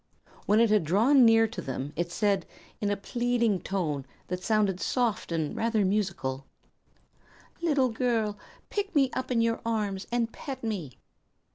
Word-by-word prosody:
When 210 Hz, +2 st, +4 dB
it 230 Hz, -2 st, +4 dB
had 210 Hz, -4 st, +4 dB
drawn 235 Hz, -, +5 dB
near 225 Hz, 0 st, +6 dB
to 215 Hz, -5 st, -6 dB
them 135 Hz, 0 st, -5 dB
it 170 Hz, +2 st, -2 dB
said, 200 Hz, -1 st, +1 dB, 0.3 s
in 205 Hz, -, +1 dB
a 205 Hz, -, 0 dB
pleading 235 Hz, -2 st, 0 dB
tone 155 Hz, -8 st, -2 dB, 0.2 s
that 180 Hz, 0 st, -3 dB
sounded 205 Hz, -3 st, +1 dB
soft 235 Hz, -7 st, -1 dB
and 160 Hz, -3 st, -1 dB
rather 225 Hz, -3 st, +1 dB
musical: 175 Hz, -10 st, -1 dB, 1.1 s
"Little 290 Hz, -6 st, +2 dB
girl, 225 Hz, -3 st, 0 dB, 0.4 s
pick 410 Hz, -3 st, -2 dB
me 270 Hz, -3 st, +4 dB
up 260 Hz, 0 st, -3 dB
in 240 Hz, -2 st, +2 dB
your 230 Hz, 0 st, 0 dB
arms, 210 Hz, -4 st, -2 dB
and 235 Hz, -1 st, 0 dB
pet 265 Hz, -3 st, -7 dB
me!" 190 Hz, -, -4 dB
215 Hz, 155 wpm, -28 LUFS, 185-235 Hz, 1.1 s, near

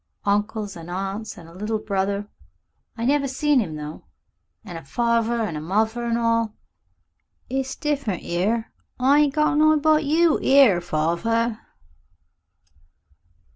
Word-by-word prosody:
Uncles 205 Hz, 0 st, -1 dB
and 170 Hz, 0 st, -10 dB
aunts 195 Hz, +4 st, -4 dB
an' 170 Hz, -, -11 dB
a 165 Hz, -, -14 dB
little 210 Hz, +4 st, -2 dB
brother. 200 Hz, 0 st, -2 dB, 0.7 s
I 230 Hz, -, -2 dB
never 280 Hz, +1 st, +2 dB
seen 285 Hz, +1 st, +2 dB
him 170 Hz, -9 st, -3 dB
though. 150 Hz, +1 st, -8 dB, 0.6 s
An' 180 Hz, -5 st, -8 dB
a 165 Hz, -, -6 dB
farver 235 Hz, -, 0 dB
and 165 Hz, -, -5 dB
muvver 220 Hz, +7 st, 0 dB
an' 230 Hz, -, +1 dB
all. 230 Hz, -2 st, 0 dB, 1.0 s
It's 265 Hz, 0 st, -2 dB
different 280 Hz, -, -2 dB
'ere. 215 Hz, +7 st, -1 dB, 0.3 s
I 275 Hz, +3 st, +4 dB
ain't 290 Hz, -2 st, +2 dB
got 300 Hz, -1 st, +2 dB
nobody 310 Hz, 0 st, +5 dB
but 310 Hz, -1 st, +4 dB
you 320 Hz, +2 st, +3 dB
'ere 265 Hz, -10 st, +5 dB
farver." 215 Hz, +9 st, 0 dB
225 Hz, 135 wpm, -23 LUFS, 195-270 Hz, 1.0 s, nobody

